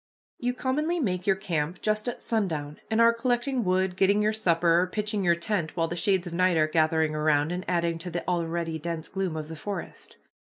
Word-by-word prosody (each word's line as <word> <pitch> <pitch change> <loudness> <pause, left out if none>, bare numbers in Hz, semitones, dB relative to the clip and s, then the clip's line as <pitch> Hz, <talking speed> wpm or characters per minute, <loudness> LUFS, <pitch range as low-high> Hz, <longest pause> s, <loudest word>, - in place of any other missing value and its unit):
You 245 0 -1
commonly 300 +7 0
make 185 - -1
your 195 - +4
camp 170 -3 -2
just 215 +2 0
at - - -7
sundown, 160 -10 -2
and 220 0 +1
are 230 0 +6
collecting 245 +2 0
wood, 185 -1 +1
getting 195 +2 +3
your 210 +1 +2
supper, 170 -4 +3
or 185 - 0
pitching 210 +1 -2
your 170 -1 +4
tent 170 -2 -2
while 165 -1 +2
the 175 - -4
shades 185 +1 +1
of 175 - -6
night 185 0 +3
are 155 - +4
gathering 160 -1 +2
around 150 0 +2
and 180 +1 -3
adding 170 -2 0
to 180 - -6
the 175 0 -4
already 170 -2 -1
dense 165 0 -4
gloom 190 -4 -3
of 155 -1 -5
the 160 - -7
forest. 200 +6 -7
180 Hz, 210 wpm, -27 LUFS, 165-210 Hz, -, are